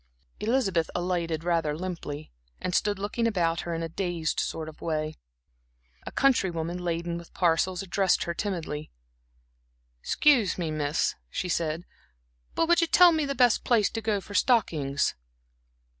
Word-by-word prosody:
Elizabeth 210 -8 +1
alighted 170 -3 -1
rather 165 -3 0
limply, 165 -4 -6 0.3
and 180 - -3
stood 205 +1 +1
looking 210 +4 -1
about 170 -6 +1
her 170 -1 -3
in 165 - -3
a - - -2
dazed 170 -2 -2
sort 160 -1 -3
of 155 - -11
way. 155 -1 -2 0.9
A - - -4
country 265 -8 +3
woman 170 +1 -3
laden 170 0 -2
with 170 - -15
parcels 180 +1 +1
addressed 190 0 +2
her 170 - -3
timidly. 165 -6 -4 1.1
"Excuse 250 - +3
me 165 -3 -2
miss," 150 0 0 0.2
she 180 - -3
said, 165 0 -1 0.7
"but 330 - +2
would 345 +1 +4
you 335 - +2
tell 355 +1 +7
me 315 -2 +1
the 275 0 -2
best 245 -2 +4
place 225 -4 +3
to 225 - -3
go 215 -2 0
for 205 - -11
stockings?" 155 - +2
175 Hz, 155 wpm, -27 LUFS, 165-210 Hz, 1.1 s, tell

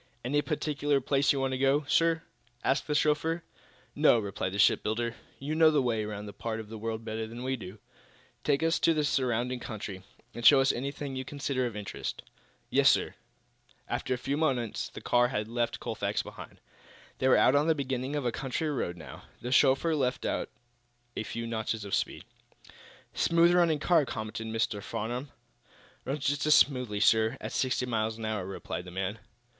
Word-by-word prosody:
"Any 145 +4 +2
particular 145 -2 0
place 135 +1 +2
you 140 - 0
want 135 0 0
to 130 - -2
go, 140 +2 +3
sir?" 165 +2 +2 0.4
asked 135 - +1
the 150 - 0
chauffeur. 155 +3 +1 0.5
"No," - - +5
replied 100 -3 -3
the - - -3
shipbuilder. 110 +3 +2 0.2
"You 145 +3 -4
know 160 0 +6
the 150 -2 +3
way 115 -4 0
around 105 -1 -5
this 100 - -8
part 115 -1 -3
of 110 -1 -8
the 110 - -7
world 115 0 -4
better 110 0 -3
than 120 +2 -8
we 130 +1 0
do. 100 -3 -9 0.7
Take 145 +1 +1
us 165 +1 +3
out - - -6
into 165 - +4
the 150 - +1
surrounding 125 -3 0
country, 105 -5 -6 0.3
and 120 - -7
show 140 +3 +8
us 135 0 +4
anything 140 +2 -4
you 130 - -3
consider 135 -2 -2
of 115 - -7
interest." 105 -2 -5 0.5
"Yes, - - +6
sir." - - +2 0.7
After 130 - -1
a - - -6
few 140 +3 -2
minutes 130 -8 -1
the - - -10
car 120 0 +3
had 105 -4 -2
left 120 +1 -1
Colfax - - -2
behind. - - -11 0.6
They 130 - +2
were 130 - +6
out 130 - +5
on 145 +2 +3
the 160 - +4
beginning 135 0 -2
of 145 -3 -2
a 120 - +1
country 140 +5 -2
road, 90 -10 -2
now. 80 - -11 0.2
The 125 - -4
chauffeur 135 +5 +4
let 130 -3 -1
out - - -1 0.7
a - - -2
few 115 +2 -5
notches 110 -2 -3
of 100 - -7
speed. - - -1 0.9
"Smooth 170 +1 +4
running 170 -3 +4
car," 155 -1 +3
commented 110 0 -5
Mr. 110 -2 -1
Farnum. 120 +8 -4 0.8
"Runs 135 +1 -3
just 145 +1 +1
as 155 - +7
smoothly, 125 -7 +2
sir, 110 +3 +4
at - - -6
sixty 130 -1 0
miles 110 -2 -1
an 115 - -5
hour," 105 -4 -2
replied 95 -2 -5
the - - -8
man. 95 +4 -3
125 Hz, 195 wpm, -29 LUFS, 110-145 Hz, 0.9 s, show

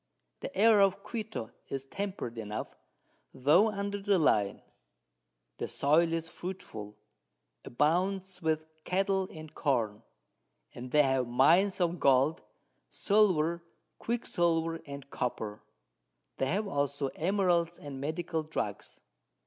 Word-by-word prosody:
The - - -7
Air 215 0 +6
of 195 -1 +2
Quito 220 - -5 0.2
is 135 -1 -4
temperate 185 - -5
enough, 105 -1 -5 0.6
tho' 155 - +5
under 200 -1 -3
the 200 -1 +3
Line; 105 - +2 1.0
the - - -2
Soil 160 +4 +3
is 165 0 -1
fruitful, 110 - -7 0.7
abounds 180 +7 0
with 155 -1 0 0.2
Cattle 190 0 +1
and 155 -1 -10
Corn, 115 -8 0 0.7
and 125 +1 -8
they 150 +3 +5
have 130 -2 +1
Mines 170 +12 +4
of 175 -1 0
Gold, 140 +3 +3 0.5
Silver, 175 -6 +2 0.4
Quick 235 +1 -2
silver 165 -1 +1
and 140 -1 -8
Copper; 110 -4 -3 0.8
they 135 - 0
have 200 +8 0
also 140 -3 -1
Emeralds 175 -1 +1
and 140 -2 -8
Medicinal 160 +2 -2
Drugs. 150 -10 -4
165 Hz, 115 wpm, -30 LUFS, 135-190 Hz, 1.0 s, Air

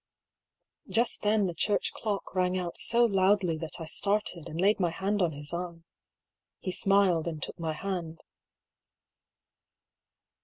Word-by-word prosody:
Just 235 +1 0
then 210 -1 +3
the 175 - -2
church 205 +5 0
clock 210 -3 -3
rang 185 0 +1
out 175 -2 -4
so 235 0 +4
loudly 195 -4 +3
that 160 +1 -5
I 165 - -5
started, 200 -1 -1
and 160 - -5
laid 205 +4 +3
my 175 -3 +2
hand 195 +4 -1
on 170 -3 +2
his 145 +2 -6
arm. 170 -1 -5 0.7
He 185 - -4
smiled, 190 -3 +3
and 160 -2 -3
took - - -5
my 160 -1 -1
hand. 170 -2 -4
185 Hz, 145 wpm, -29 LUFS, 165-200 Hz, 0.7 s, so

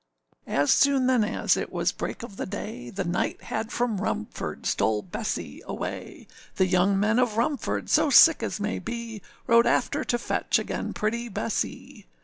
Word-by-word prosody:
â - - -6
As 145 +1 +3
soon 275 -2 +4
then 255 -3 +3
as 210 - +1
it - - -4
was - - 0
break - - -5
of 215 -4 -9
the - - -4
day, 195 - -6
The 195 0 -3
knight 175 0 -2
had 220 0 -4
from 230 -5 -1
Rumford 105 - -4
stole 105 -1 +1
Bessee 90 - -5
away; - - -6 0.3
The 190 - +3
young 185 +2 +2
men 215 +4 +2
of 235 -4 +1
Rumford, 265 +5 -1
so 305 - +3
sick 315 +4 +7
as - - -3
may 210 +1 -2
be, 235 -2 -6 0.2
Rode 235 0 +5
after - - +1
to 240 - 0
fetch 240 - 0
again - - -3
pretty 235 +3 -2
Bessee. 215 - -4
220 Hz, 175 wpm, -26 LUFS, 195-235 Hz, 0.3 s, sick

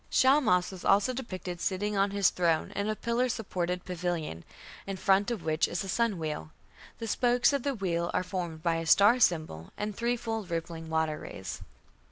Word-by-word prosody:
Shamash 255 -10 +4
was 185 -2 -9
also 205 +6 +3
depicted 185 -8 -6
sitting 205 +2 -1
on 195 +1 +3
his 200 -1 +3
throne 170 -3 +1
in 200 +1 -1
a 215 - 0
pillar 235 +3 0
supported 180 -6 -2
pavilion, 175 - -3 0.4
in 195 -1 -3
front 195 +2 +3
of 230 -7 -3
which 155 0 +1
is 175 - -3
a - - -6
sun 230 0 +1
wheel. 150 - -4 0.5
The 230 - -5
spokes 245 +4 +3
of 280 - +1
the 280 +1 -1
wheel 170 -4 -1
are - - 0
formed 175 -4 -5
by 165 -1 +2
a 165 0 -4
star 205 +8 +6
symbol 155 - +1
and 210 0 -3
threefold 230 -3 -2
rippling 165 -1 -4
"water 160 -1 0
rays". 95 - -7
190 Hz, 185 wpm, -29 LUFS, 170-225 Hz, 0.5 s, star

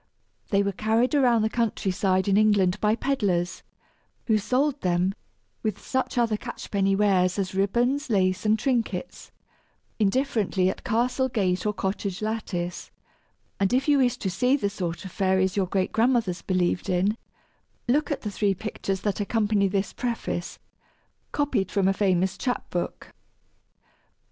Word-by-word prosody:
They 200 -1 +3
were 200 - 0
carried 225 +6 +1
around 245 -6 +4
the - - +3
country 220 -4 -1
side 190 +1 +1
in 195 - +3
England 205 -3 +3
by 215 +1 +3
peddlers, 200 -10 -1 0.6
who 220 -2 +3
sold 265 +7 0
them 180 +1 +1 0.5
(with 215 -3 -2
such 260 -1 -2
other 230 -3 +2
catch - - -8
penny 195 -1 +2
wares 190 -3 +2
as 190 -2 -2
ribbons, 240 +9 +1
lace, 185 -3 +1
and 215 0 +3
trinkets) 230 -5 -2 0.7
indifferently 210 -4 +1
at - - -11
castle 250 +3 +1
gate 190 -4 0
or 210 - +1
cottage 195 -1 -3
lattice; 195 -5 -3 0.7
and 195 +3 +1
if 265 +3 +2
you 290 -1 +4
wish 250 -3 +2
to 190 - -2
see 250 +9 +2
the 200 -6 -1
sort 175 -2 -4
of 190 - -7
fairies 190 -1 +1
your 195 -2 +1
great 190 +1 0
grandmothers 225 -6 +1
believed 180 0 0
in, 190 +4 +2 0.7
look 290 +5 +2
at 290 - -2
the 210 - -4
three 200 -1 +1
pictures 195 -1 -4
that 205 0 -1
accompany 205 -1 +1
this 195 +1 -1
preface, 235 -7 -3 0.7
copied 265 -10 0
from 195 -2 +1
a 195 - +3
famous 190 -2 +1
chap 250 -2 -2
book. 175 - -4
205 Hz, 155 wpm, -25 LUFS, 190-235 Hz, 0.7 s, around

